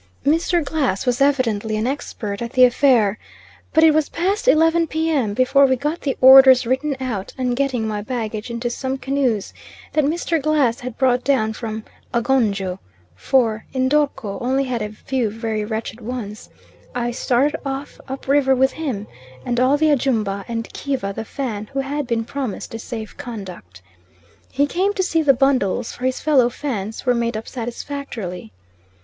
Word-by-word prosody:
Mr. 330 +2 +2
Glass 270 -9 -1
was 250 +1 0
evidently 230 -6 +1
an 215 - -1
expert 225 -6 -4
at 235 +1 -5
the 255 - +5
affair, 245 -5 +4 0.5
but 320 - +4
it 320 -1 +7
was 310 -1 +1
past 390 +7 -1
11 325 -3 +4
p.m. 305 -9 0
before 275 +3 +4
we 260 - +2
got 295 +6 -3
the 275 - -2
orders 260 -1 +9
written 265 +3 0
out, 225 -7 -4
and 250 -2 0
getting 255 -4 0
my 210 -1 -3
baggage 220 -1 -4
into 235 +1 -3
some 260 +2 -3
canoes, 265 -6 -1 0.4
that 305 - +3
Mr. 325 +2 0
Glass 280 -6 +2
had 250 -2 -7
brought 250 -2 +2
down 250 -6 +1
from 220 -1 -5 0.3
Agonjo, 215 -7 +1 0.4
for 220 - +1
N'dorko 260 -6 0
only 265 +3 +1
had 250 -3 -3
a 210 - -3
few 235 +2 -2
very 220 0 -3
wretched 220 +2 -5
ones, 220 -3 -6 0.5
I 240 -1 -1
started 255 +4 +1
off 275 0 -5
up 265 0 -7
river 270 -1 +4
with 265 +1 +3
him 260 -11 -4 0.4
and 240 -1 0
all 260 +3 +4
the 310 0 +3
Ajumba, 220 -8 0
and 230 -1 -3
Kiva, 260 -9 -3
the 225 - -5
Fan, 220 -5 -4
who 275 - 0
had 285 0 -3
been 230 -2 -1
promised 260 -6 -5
a 225 - -5
safe 225 -2 -7
conduct. 180 - -9 0.7
He 280 +2 +2
came 380 +7 0
to 375 - +1
see 330 -3 +1
the 280 -3 +4
bundles 250 -4 +1
for 255 - -3
his 260 - -2
fellow 270 -6 +4
Fans 225 -6 -5
were 250 - +4
made 235 -1 -1
up 220 - -7
satisfactorily. 235 - -6
255 Hz, 170 wpm, -21 LUFS, 220-280 Hz, 0.7 s, orders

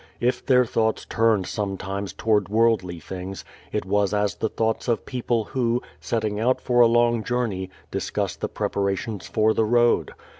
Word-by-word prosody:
If 125 +1 0
their 125 -2 +4
thoughts 110 -1 0
turned 110 -4 +2
sometimes 100 -1 -3
toward 105 -3 +1
worldly 105 -6 +2
things, 95 +4 -7 0.3
it - - -2
was 100 +1 +1
as 105 -1 +1
the 110 - -2
thoughts 110 +3 -1
of 120 -2 0
people 120 -3 -1
who, 120 0 -1 0.2
setting 110 -2 -2
out 125 +3 +2
for 120 -1 +1
a 120 - +8
long 120 -1 +3
journey, 105 -6 -2 0.2
discuss - - -2
the - - -4
preparations 100 +1 -2
for 110 0 +2
the 110 - +2
road. 120 +1 +2
110 Hz, 160 wpm, -24 LUFS, 100-120 Hz, 0.3 s, a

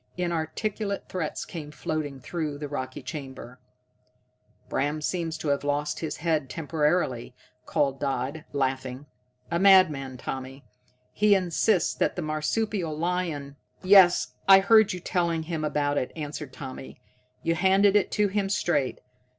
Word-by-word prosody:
Inarticulate 180 +5 -2
threats 170 -5 -3
came 155 -4 -7
floating 150 -2 -4
through 150 +2 -4
the 145 0 -5
rocky 130 -2 -5
chamber. 130 -2 -8 1.1
"Bram 145 +2 -1
seems 165 +1 -2
to 150 - -3
have 140 0 0
lost 145 +1 -1
his 160 -2 -4
head 155 -4 0
temporarily," 150 -5 -1 0.3
called 135 -2 0
Dodd, 140 +2 -2
laughing. 130 -1 -2 0.5
"A 170 - +1
madman, 155 -9 +5
Tommy. 130 +2 -6 0.5
He 210 -1 +4
insists 185 +1 +1
that - - 0
the 175 - -3
marsupial 160 +2 -1
lion 165 -5 -2
" - - -47
"Yes, 185 -9 +6
I 195 0 +9
heard 220 +1 +5
you 180 - -4
telling 170 -2 -1
him 160 -1 -4
about 145 -1 0
it," 130 - -4
answered 150 -2 -6
Tommy. 130 -1 -9 0.4
"You 165 - +2
handed 195 +3 +4
it 205 - +3
to 210 0 +3
him 195 0 -1
straight. 175 -9 0
155 Hz, 140 wpm, -26 LUFS, 140-180 Hz, 1.1 s, I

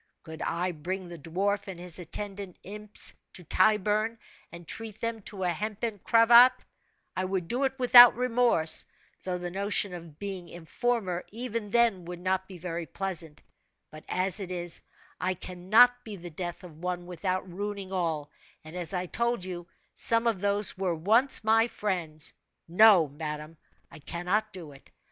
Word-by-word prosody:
Could 160 -1 -9
I 180 +2 -1
bring 180 +4 -5
the 170 -1 -9
dwarf 195 +8 -1
and 185 -3 -7
his 175 0 -3
attendant 195 +2 -6
imps 210 +2 -5 0.2
to 180 - -9
Tyburn, 215 +5 +2 0.3
and 170 -1 -11
treat 220 -2 -5
them 230 -1 -3
to 195 -1 -6
a 180 - +1
hempen 215 +3 -3
cravat, 235 +4 +6 0.5
I 185 - -1
would 185 -2 -2
do 255 +7 0
it 265 0 -2
without 245 -2 +9
remorse 235 -10 +2 0.4
though 180 -1 -2
the 175 0 -5
notion 200 0 -1
of 165 -4 -10
being 190 -3 -6
informer, 180 +2 -2
even 230 -1 -4
then, 225 -5 +2
would 175 0 -7
not 190 +1 -1
be 190 - -10
very 170 -1 -5
pleasant; 170 -6 -5 0.5
but 155 0 -11
as 185 +2 0
it 190 -3 -5
is, 175 -2 0 0.4
I 185 +2 0
cannot 215 +8 +3
be 215 -2 -7
the 175 -2 -9
death 175 +2 -5
of 160 -4 -12
one 180 0 -3
without 185 +2 -3
ruining 200 +1 -5
all, 165 -6 -2 0.3
and 155 +2 -10
as 180 +1 -1
I 180 0 -1
told 235 +1 -1
you, 175 -2 -6 0.3
some 230 0 +3
of 225 -6 +1
those 205 0 +2
were 185 -3 -1
once 225 - +2
my 225 +1 +4
friends. 170 -9 -3 0.3
No, 185 -1 +6
madame, 150 +2 -6 0.4
I 165 - -11
cannot 180 +8 -2
do 175 -6 -9
it. 140 - -17
185 Hz, 165 wpm, -28 LUFS, 175-215 Hz, 0.5 s, without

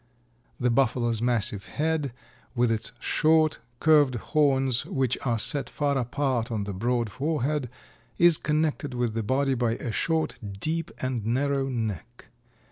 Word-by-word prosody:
The 125 -1 +2
Buffalo's 120 -2 +1
massive 115 -5 0
head, 155 -3 -1 0.4
with 120 -1 +2
its 110 -1 -2
short, 155 0 +3 0.2
curved 150 -5 +4
horns 135 -1 +1
which 130 -2 0
are 120 -3 +1
set 135 +3 +1
far 145 -1 0
apart 125 -2 -1
on 110 -3 -1
the 100 0 -5
broad 120 +2 -1
forehead, 145 0 -1 0.5
is 170 -2 +6
connected 150 -3 -1
with 120 -2 -1
the 115 - -1
body 135 +5 +1
by 120 -2 0
a 115 - -4
short 160 +7 -1 0.2
deep 165 +5 -1
and 130 -4 -2
narrow 135 +4 0
neck. 115 - -5
130 Hz, 140 wpm, -26 LUFS, 115-145 Hz, 0.5 s, is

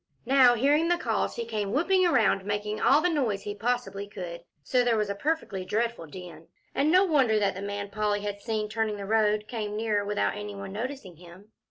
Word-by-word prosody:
Now 255 -1 +6
hearing 290 +7 +3
the 350 0 +2
calls, - - -1
he 470 - -3
came 205 - -3
whooping 370 +5 +3
around, 220 - +3
making 205 +1 -3
all 285 +3 +5
the 355 - +2
noise 255 - 0
he 205 - -4
possibly 205 -2 -2
could, 175 -4 -7 0.2
so 250 - +2
there 235 -2 +2
was 210 -1 0
a - - -1
perfectly 200 -6 -2
dreadful 220 -1 -2
din, 165 -1 -11 0.3
and 295 +3 +2
no 370 +3 +6
wonder 270 - +3
that 200 -2 +1
the 190 - -7
man 200 0 -5
Polly 210 0 0
had 205 0 -5
seen 215 -2 -2
turning 215 -1 -2
the 200 - -6
road 215 0 +1
came 210 -2 -4
nearer 215 -2 0
without 205 0 -1
any 205 0 -6
one 195 -1 -7
noticing 225 - -6
him. 180 +5 -15
210 Hz, 210 wpm, -27 LUFS, 200-250 Hz, 0.3 s, Now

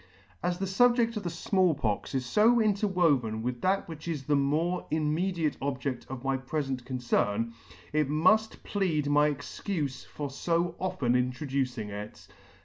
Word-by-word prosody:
As 175 0 0
the 195 - -2
fubjedt 235 +3 +3
of 210 - -2
the 180 - -3
Small 180 0 +2
Pox 115 0 -2
is 130 -2 -1
fo 230 +3 +5
interwoven 175 - +2
with 125 0 -3
that 195 +1 +1
which 160 -1 -8
is 155 -5 -2
the 145 +1 +2
more 155 +6 0
immediate 160 +1 0
object 135 -2 -3
of 130 -1 -6
my 135 0 +1
prefent 135 -1 -3
concern, 115 -3 0 0.4
it 150 -2 +2
muff 200 +9 +3
plead 170 -8 0
my 145 +1 +4
excufe 145 0 -4
for 145 - -5
fo 170 +4 0
often 180 -10 0
introducing 125 -3 -1
it. 105 -1 -8
150 Hz, 150 wpm, -29 LUFS, 130-180 Hz, 0.4 s, fo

